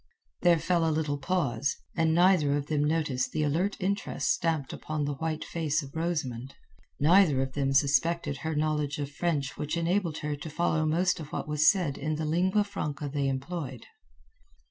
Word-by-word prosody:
There 175 -1 +5
fell 170 +1 +1
a 165 - +2
little 150 -2 -1
pause, 140 -5 0 0.2
and 160 -1 +2
neither 170 -5 +4
of 145 - -3
them 150 -1 0
noticed 150 -4 0
the 155 - 0
alert 170 +8 0
interest 200 +2 -1
stamped 160 -5 -1
upon 155 -2 -3
the 145 - -2
white 155 +2 -3
face 155 -2 -1
of 140 +2 -11
Rosamund. 140 -7 -3 0.4
Neither 165 -2 +5
of 135 0 -1
them 135 -1 0
suspected 145 +2 +2
her 160 +2 -3
knowledge 150 -1 0
of 145 -1 -4
French 145 -3 -2
which 150 +3 -2
enabled 170 -1 0
her 150 -1 -1
to 145 +3 -8
follow 155 0 0
most 180 +3 +1
of 150 -2 -8
what - - -4
was 150 +1 +4
said 175 -8 0
in 155 +2 -1
the 155 +1 -3
lingua 185 +6 +2
franca 150 -7 -4
they 140 0 -1
employed. 135 -1 -4
155 Hz, 180 wpm, -28 LUFS, 145-170 Hz, 0.4 s, There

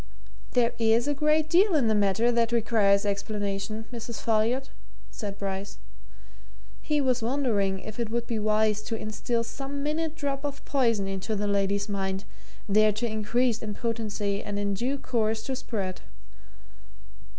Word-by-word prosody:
"There 240 -1 +3
is 230 +3 +3
a 290 - +2
great 305 +2 +2
deal 360 +3 +4
in 270 -7 +3
the 220 - +3
matter 205 +3 +3
that 235 -1 +2
requires 210 -3 +3
explanation, 205 +1 -2
Mrs. 230 -1 -5
Folliot," 230 +4 +1 0.4
said 205 -3 -5
Bryce. 195 0 -4 1.0
He 300 -1 +1
was 255 -3 +2
wondering 225 -6 +1
if 215 +1 -8
it 230 -2 -1
would 235 +1 -1
be 230 -2 -2
wise 215 0 +2
to 225 +1 -3
instil 225 +2 -1
some 275 +4 -5
minute 310 +1 -1
drop 280 -3 -2
of 285 -1 -5
poison 230 -8 +2
into 195 +3 -2
the 205 0 -1
lady's 200 0 +1
mind, 195 -1 -2 0.4
there 215 +1 +5
to 210 +3 -2
increase 230 +2 +1
in 210 -2 -4
potency 215 -3 -2
and 205 0 -3
in 200 0 0
due 250 +8 -1
course 220 -4 0
to 265 - -2
spread. 200 -7 -4
220 Hz, 155 wpm, -27 LUFS, 205-250 Hz, 1.0 s, there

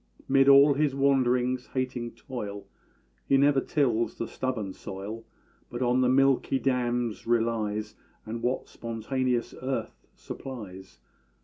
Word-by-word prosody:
'Mid 135 0 +5
all 140 +1 +8
his 145 -1 +1
wanderings 130 -2 +2
hating 125 -2 -2
toil, 100 -6 -7 0.6
He 135 - +4
never 140 0 +4
tills 120 -7 0
the 115 - -4
stubborn 115 -7 -3
soil; 100 +5 -7 0.4
But 120 +1 -3
on 125 +1 +2
the 125 - +3
milky 135 0 +3
dams 120 -4 -1
relies, 110 -2 0 0.3
And 115 +1 -5
what 125 +2 -1
spontaneous 120 +2 -2
earth 130 +1 -4
supplies. 95 - -9
125 Hz, 120 wpm, -28 LUFS, 115-135 Hz, 0.6 s, all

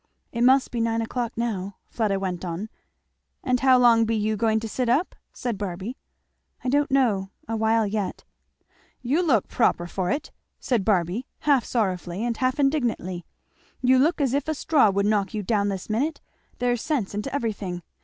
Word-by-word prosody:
"It 235 - -3
must 260 +2 +4
be 235 - -1
nine 230 0 0
o'clock 235 0 -3
now," 200 -5 -2
Fleda 210 -4 0
went 185 -2 -3
on. 180 +5 -4 0.7
"And 250 -2 +1
how 260 -1 +5
long 235 -2 +5
be 225 0 0
you 215 0 0
going 220 +1 +2
to 225 - -4
sit 245 +2 -1
up?" 285 +10 +2 0.2
said 235 -5 -4
Barby. 195 +4 -4 0.7
"I 255 - -1
don't 290 +2 +2
know 225 -8 +2 0.2
a 225 - -2
while 225 0 +2
yet." 205 -1 -3 0.8
"You 280 +8 +2
look 265 - +2
proper 175 - +1
for 180 +1 -2
it!" 285 +5 -2 0.3
said 240 -6 0
Barby 190 +4 0
half 280 -5 +3
sorrowfully 190 -2 -1
and 235 -1 -1
half 255 +4 0
indignantly; 240 - 0 0.5
"you 255 0 +4
look 315 +6 +2
as 270 -3 +1
if 285 +1 0
a 315 - 0
straw 290 -6 +3
would 200 +1 +1
knock 205 -1 +1
you 210 - -2
down 205 0 +1
this 195 -2 -4
minute. 270 +9 -1 0.4
There's 245 -1 0
sense 270 -12 -1
into 210 +7 -3
everything. 205 -9 -3
225 Hz, 180 wpm, -25 LUFS, 200-255 Hz, 0.8 s, how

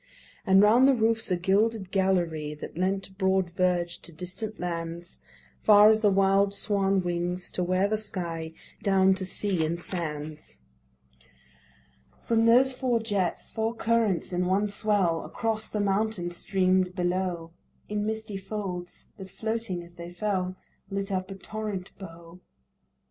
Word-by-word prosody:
And 190 +1 +6
round 235 +5 +6
the 275 - +5
roofs 225 -1 +1
a 180 - +2
gilded 195 +2 +1
gallery 170 -6 0
That 150 - -9
lent 190 +2 -2
broad 190 -2 +1
verge 175 -1 0
to - - -9
distant 185 +6 -6
lands, 170 0 -5 0.4
Far 210 0 +7
as 220 0 +3
the 210 - +5
wild 195 +1 +3
swan 195 -2 +1
wings, 175 +1 -2
to 180 - -1
where 185 +2 +2
the 215 +1 0
sky 170 -6 -4 0.2
Dipt - - -24
down 190 -1 +4
to 190 0 -2
sea 185 -2 -1
and 165 +2 -2
sands. 155 - -6 1.7
From 225 0 +2
those 255 +3 +5
four 250 -2 0
jets 205 -6 -2
four 225 +1 -2
currents 225 -6 +1
in 180 0 0
one 200 +3 +1
swell 200 -5 +1
Across 220 -1 -2
the 210 - -3
mountain 200 -2 0
stream'd 185 0 +1
below 175 -2 -2 0.4
In 210 0 -2
misty 220 -1 -3
folds, 195 -3 -6
that 190 -1 -9
floating 220 -6 -3
as 170 0 -15
they 170 0 -9
fell 185 0 -2 0.3
Lit 195 0 -3
up 185 0 -2
a 195 - -6
torrent 205 -1 -5
bow. 170 -2 -11
190 Hz, 150 wpm, -27 LUFS, 175-210 Hz, 1.7 s, Far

